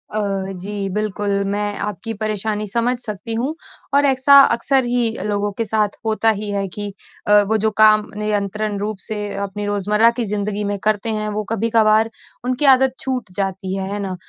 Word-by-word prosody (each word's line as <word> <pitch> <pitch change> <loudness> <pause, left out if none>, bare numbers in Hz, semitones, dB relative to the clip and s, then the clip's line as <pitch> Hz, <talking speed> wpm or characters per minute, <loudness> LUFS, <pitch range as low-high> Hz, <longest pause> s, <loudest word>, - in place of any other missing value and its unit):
अ, - - +1 0.4
जी 200 0 -4
बिल्कुल 210 -1 -2 0.3
मैं 205 0 -2
आपकी 210 +3 -5
परेशानी 215 0 -2
समझ 195 - -9 0.3
सकती 215 +2 -3
हूँ। 285 +5 -2 0.4
और 285 0 +4
ऐसा 275 +1 +6 0.2
अक्सर 265 +2 +2
ही 240 -1 +2 0.2
लोगों 205 0 -1
के 230 - -1
साथ 210 -1 0
होता 220 0 +3
ही 210 - -2
है 200 -1 -2
कि 205 +2 -6 0.3
अ, 210 0 +7
वो 220 +1 +2
जो 220 +1 0
काम 215 -1 +6
नियंत्रण 210 0 -2
रूप 210 0 -3
से 215 - -2 0.3
अपनी 205 +1 -6
रोज़मर्रा 210 +3 +2
की 235 - 0
ज़िंदगी 210 0 -2
में - - -3
करते 215 +1 +1
हैं, 215 0 -3
वो 210 0 -3
कभी-कभार 220 0 +3 0.4
उनकी 255 +3 +1
आदत 260 0 +1
छूट 255 -7 -3
जाती 190 -1 -3
है, 190 0 -4
है 205 - -3
ना? 190 -2 -4
210 Hz, 180 wpm, -19 LUFS, 205-225 Hz, 0.4 s, अ